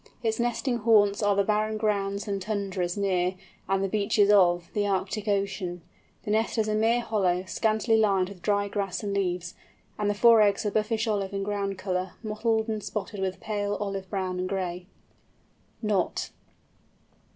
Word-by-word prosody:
Its 220 0 0
nesting 240 +1 0
haunts 210 -2 +4
are 205 -1 +3
the 200 - +3
barren 215 +1 0
grounds 200 -1 -1
and 200 -1 -2
tundras 195 -3 -2
near, 185 -2 +1 0.3
and 195 0 +1
the - - +1
beaches 205 0 +2
of, 175 -4 +4
the 205 -1 0
Arctic 200 +2 -2
Ocean. 195 -4 -1 0.4
The 210 - -3
nest 220 +2 +1
is 220 -1 +1
a 215 - 0
mere 225 +3 +2
hollow, 185 -6 0
scantily 220 +3 +1
lined 195 -4 +3
with 195 -3 -12
dry 205 +1 +1
grass 200 -1 -3
and 200 -1 -2
leaves, 180 -3 -1 0.5
and 205 -1 +1
the 205 - 0
four 230 +1 +6
eggs 205 0 +2
are 210 - 0
buffish 220 +1 0
olive 200 -2 -1
in 195 - -1
ground 200 -1 -2
colour, 185 -1 -2
mottled 220 +1 0
and 215 -2 -3
spotted 210 -1 -5
with 185 -1 -2
pale 205 -1 -2
olive 195 -2 -4
brown 185 -2 -2
and 185 0 -2
gray. 180 -2 -3 1.0
KNOT. 205 -4 0
200 Hz, 175 wpm, -27 LUFS, 190-215 Hz, 1.0 s, four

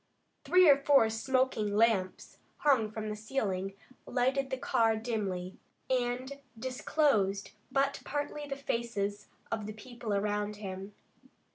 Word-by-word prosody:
Three 365 -1 +6
or 285 -2 +8
four 275 -5 +4
smoking 225 -3 +1
lamps, 210 -4 +1 0.2
hung 260 -8 +3
from 215 0 -5
the 210 - -3
ceiling, 200 -4 -2 0.3
lighted 265 +2 +1
the 260 - -2
car 225 -3 +2
dimly, 200 -5 -3 0.3
and 255 +2 -1 0.2
disclosed 240 -5 +1 0.2
but 275 +1 +1
partly 290 0 -3
the 275 - -3
faces 230 -6 -2 0.2
of 220 -2 -2
the 215 - -5
people 235 +1 -7
around 210 +1 -1
him. 195 0 -7
225 Hz, 125 wpm, -31 LUFS, 205-265 Hz, 0.3 s, or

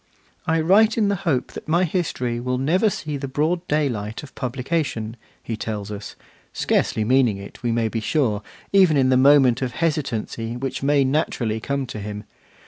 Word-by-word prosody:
'I 160 0 +2
write 210 +8 +4
in 210 -3 +3
the 200 - +1
hope 130 -4 0
that - - -9
my 170 +3 +3
history 145 -9 -1
will 125 +1 -1
never 170 - +2
see 150 -6 -4
the 140 0 -4
broad 160 +6 -1
day 150 -1 +2
light 110 -1 -4
of 135 - -12
publication,' 125 -3 -2 0.3
he 115 - -3
tells 105 -2 -5
us, 105 0 -7 0.4
scarcely 110 - 0
meaning 125 -3 +3
it, 100 0 -11
we 120 -2 0
may 115 -1 +1
be 115 +1 -2
sure, 110 -2 0 0.3
even 185 -6 +5
in 130 -1 +3
the 130 - +4
moment 135 -2 +5
of 125 -3 -2
hesitancy 120 -7 -2
which 130 0 -4
may 140 0 +3
naturally 130 -5 0
come 140 +3 -2
to 115 -3 -7
him. 105 0 -6
130 Hz, 185 wpm, -22 LUFS, 115-155 Hz, 0.4 s, even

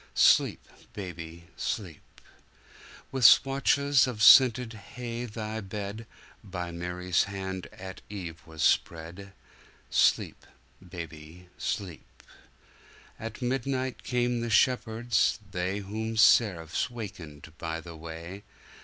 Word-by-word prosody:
Sleep, - - +4 0.3
baby, 85 -4 -8
sleep! 90 -9 -4 1.1
With 130 -2 -2
swathes 140 +2 +5
of 110 -4 -2
scented 120 0 +7
hay 120 +2 -6
Thy 110 -1 -5
bedBy 105 +2 -6 0.7
Mary's 90 +1 -1
hand 95 -2 -5
at 95 0 -9
eve 85 -5 -7
was 80 -1 -5
spread. 85 +4 0 0.6
Sleep, - - +2 0.5
baby, 85 0 -9
sleep! 100 -8 -5 1.0
At 115 +2 -7
midnight 130 +1 -2
came 120 -1 0
the 120 - -3
shepherds, 115 0 +2
theyWhom 100 +5 -3
seraphs 100 -4 +3
wakened 85 - -9
by 80 0 -3
the 85 0 -10
way. 85 +4 -8
100 Hz, 95 wpm, -28 LUFS, 85-115 Hz, 1.1 s, scented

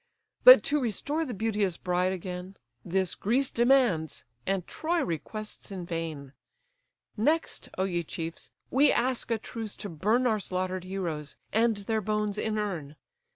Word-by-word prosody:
But - - +11
to 295 0 +1
restore 285 - -1
the 255 - -5
beauteous 205 -4 0
bride 180 0 0
again, 185 +1 -6 0.3
This 185 +1 0
Greece 255 +6 +1
demands, 235 - +2 0.2
and 190 -2 0
Troy 335 +2 -1
requests 210 +8 -5
in 185 -3 -5
vain. 160 -5 -5 0.8
Next, 305 +10 0
O 190 - +1
ye 175 -3 0
chiefs! 165 0 -6 0.2
we 280 +3 +5
ask 250 0 0
a 230 - +2
truce 225 -1 -6
to 205 - -6
burn 215 +10 +1
Our 220 -3 +2
slaughter'd 185 -1 -2
heroes, 170 -6 -4 0.2
and 225 0 +3
their 215 +2 -1
bones 210 0 -1
inurn. 200 -9 -2
200 Hz, 145 wpm, -28 LUFS, 180-230 Hz, 0.8 s, But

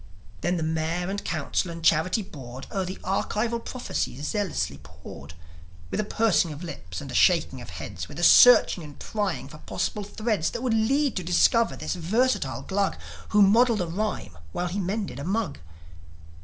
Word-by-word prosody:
Then 175 +1 0
the 165 - -2
Mayor 160 +3 -1
and 200 +1 -4
Council 165 +2 -1
and 165 -1 -7
Charity 170 +7 +3
Board 130 -6 -9
O'er 195 -2 -1
the 185 +1 -5
archival 225 +4 -1
prophecy 245 - -3
zealously 150 - -2
pored, 75 -1 -12 0.6
With - - -2
a - - +2
pursing 210 -6 +2
of 150 +3 -8
lips 170 - -7
and - - -8
a - - -7
shaking - - +3
of - - -10
heads, - - -7
With - - -11
a - - -3
searching 245 -8 +7
and 145 -2 -11
prying 205 -9 -3
for 150 +2 -12
possible 210 - -3
threads 205 -4 -1
That 235 - -5
would 250 -3 +1
lead 265 +5 +2
to 185 - -2
discover 205 +6 +3
this - - -3
versatile 210 +7 0
Glug 200 0 0 0.3
Who 210 -1 +5
modelled 225 +2 +4
a - - 0
rhyme 185 - -3 0.2
while 180 0 -2
he 190 +4 -3
mended 195 - -3
a - - -5
mug. 200 - -2
185 Hz, 180 wpm, -26 LUFS, 160-215 Hz, 0.6 s, searching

